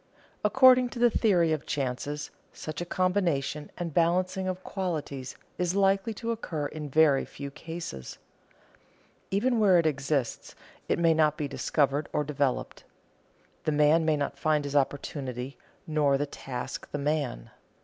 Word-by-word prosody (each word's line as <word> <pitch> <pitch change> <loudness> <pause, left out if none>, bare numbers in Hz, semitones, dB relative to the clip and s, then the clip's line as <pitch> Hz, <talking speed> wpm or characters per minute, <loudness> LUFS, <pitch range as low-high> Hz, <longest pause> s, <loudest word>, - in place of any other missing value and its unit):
According 255 +3 +6
to 240 - -9
the 240 0 +4
theory 175 -9 +3
of 155 - -4
chances, 140 +2 -3 0.2
such 155 +1 -6
a 175 - -4
combination 175 -6 0
and 170 -3 -4
balancing 185 +3 +1
of 185 0 -3
qualities 150 -9 -4 0.2
is 180 +1 0
likely 195 +2 +2
to 230 +2 -3
occur 165 -10 -3
in 150 0 -5
very 145 -1 +4
few 140 0 -8
cases. 145 - -7 1.1
Even 235 +5 +1
where 195 -4 +6
it 170 - +3
exists, 140 -3 -1 0.3
it - - +2
may 165 -1 +4
not 155 -1 +2
be 150 - -2
discovered 140 +1 0
or 150 - +1
developed. 140 -3 -2 0.8
The - - +2
man 150 +2 +4
may 155 -1 +2
not 140 -1 -3
find 155 -1 +2
his 140 0 -4
opportunity, 135 -2 -2 0.3
nor 150 -3 +2
the 145 - 0
task 130 -3 -6
the - - -2
man. 145 - -2
155 Hz, 150 wpm, -28 LUFS, 140-185 Hz, 1.1 s, According